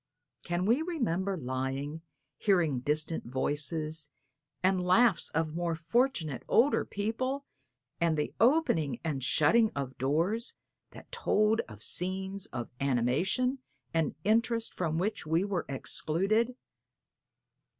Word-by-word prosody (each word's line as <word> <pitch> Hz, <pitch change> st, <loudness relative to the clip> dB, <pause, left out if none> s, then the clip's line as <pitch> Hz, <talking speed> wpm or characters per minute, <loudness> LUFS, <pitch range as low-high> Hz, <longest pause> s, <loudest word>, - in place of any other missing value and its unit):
Can 175 Hz, +1 st, -1 dB
we 235 Hz, +8 st, +3 dB
remember 200 Hz, -, -1 dB
lying, 135 Hz, +3 st, -3 dB, 0.4 s
hearing 170 Hz, -10 st, +2 dB
distant 150 Hz, +5 st, 0 dB
voices, 150 Hz, +4 st, -1 dB, 0.5 s
and 185 Hz, -1 st, +3 dB
laughs 195 Hz, +3 st, +4 dB
of 160 Hz, -1 st, -1 dB
more 170 Hz, 0 st, -1 dB
fortunate, 165 Hz, -, 0 dB
older 270 Hz, +5 st, +4 dB
people 255 Hz, +7 st, -2 dB, 0.5 s
and 165 Hz, -2 st, +2 dB
the 150 Hz, -, -2 dB
opening 200 Hz, -, +3 dB
and 145 Hz, -5 st, -2 dB
shutting 220 Hz, -, +4 dB
of 140 Hz, -2 st, -2 dB
distant 130 Hz, -, -22 dB
doors, 170 Hz, -, 0 dB, 0.4 s
that -, -, -14 dB
told 220 Hz, -, +2 dB
of 110 Hz, -1 st, -11 dB
scenes 190 Hz, +2 st, -1 dB
of 120 Hz, -1 st, -6 dB
animation 140 Hz, -, +1 dB, 0.3 s
and 165 Hz, -4 st, 0 dB
interest 230 Hz, +1 st, +1 dB
from 160 Hz, -3 st, -1 dB
which 200 Hz, -1 st, -2 dB
we 165 Hz, +3 st, +2 dB
were 195 Hz, -4 st, -2 dB
excluded? 195 Hz, -, 0 dB
175 Hz, 120 wpm, -30 LUFS, 150-220 Hz, 0.5 s, laughs